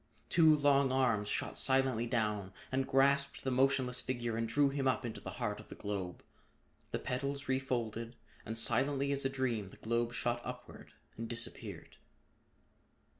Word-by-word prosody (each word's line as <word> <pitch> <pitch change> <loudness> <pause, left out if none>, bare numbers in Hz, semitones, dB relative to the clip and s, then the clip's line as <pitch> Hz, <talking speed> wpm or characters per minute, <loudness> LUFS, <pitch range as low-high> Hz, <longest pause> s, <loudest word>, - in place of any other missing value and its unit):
Two 160 -3 +6
long 140 -2 +4
arms 115 -6 +2
shot - - -2
silently 130 -3 +2
down 105 -5 -1 0.2
and 130 0 0
grasped 140 +1 +2
the 130 - 0
motionless 130 -1 +2
figure 120 -3 -2
and 115 0 -1
drew 140 +4 +4
him 135 -1 -1
up 130 -1 +1
into 110 -3 -5
the - - -6
heart - - -2
of - - -12
the - - -8
globe. 95 -3 -4 0.7
The - - -1
petals 140 +2 -3
refolded, 120 -3 -1 0.3
and 110 +1 -3
silently 135 +5 +2
as 140 -1 0
a - - +3
dream 120 -7 -1
the - - -15
globe 120 +1 -1
shot 120 +1 0
upward 125 0 -9 0.2
and 115 0 -5
disappeared. 115 -1 -4
125 Hz, 160 wpm, -34 LUFS, 115-135 Hz, 0.7 s, Two